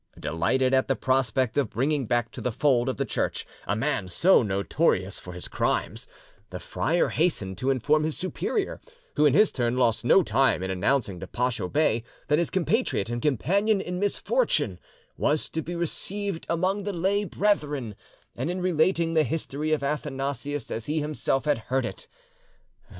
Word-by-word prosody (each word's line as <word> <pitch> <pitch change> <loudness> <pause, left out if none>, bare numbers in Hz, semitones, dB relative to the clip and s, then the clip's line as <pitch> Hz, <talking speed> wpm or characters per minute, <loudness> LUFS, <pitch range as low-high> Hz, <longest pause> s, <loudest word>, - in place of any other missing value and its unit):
Delighted 130 - +1
at 130 0 +3
the 135 - +1
prospect 130 -2 0
of 135 -7 0
bringing 135 +2 0
back 120 0 0
to - - -8
the 125 - -1
fold 125 0 +2
of 130 - -3
the 140 - 0
Church - - -2 0.2
a 100 - +1
man 125 -4 -1
so 170 - +4
notorious 100 - 0
for 90 - -9
his 90 - -5
crimes, - - -1 0.4
the - - -6
friar 170 +2 0
hastened 100 - -1
to 130 - 0
inform 145 +4 +2
his 155 -1 -1
superior, 390 - -2 0.3
who 150 - +5
in 140 - +3
his 210 +2 +5
turn 120 -1 -1
lost 115 -3 +2
no 180 +10 +5
time 130 - +2
in 95 - -2
announcing 100 0 0
to - - -7
Pacho 120 -7 -1
Bey 145 -7 +1 0.3
that 150 +1 +4
his 170 - 0
compatriot 190 - 0
and 120 0 -2
companion 195 - +2
in 180 -1 -4
misfortune 475 - +1 0.4
was 150 +1 +1
to 160 - -2
be 175 +2 -6
received 190 +2 -2
among 185 +4 0
the 205 0 -3
lay 190 +4 +1
brethren, 150 - 0 0.4
and 125 - -3
in 180 +1 -2
relating 170 -1 +1
the 160 -1 +4
history 150 +1 -2
of 155 -2 +1
Athanasius 140 -2 -3
as 115 - -4
he 155 +2 0
himself 150 -2 -1
had 145 -5 +2
heard 130 +1 +1
it. - - -6
145 Hz, 175 wpm, -26 LUFS, 120-170 Hz, 0.4 s, who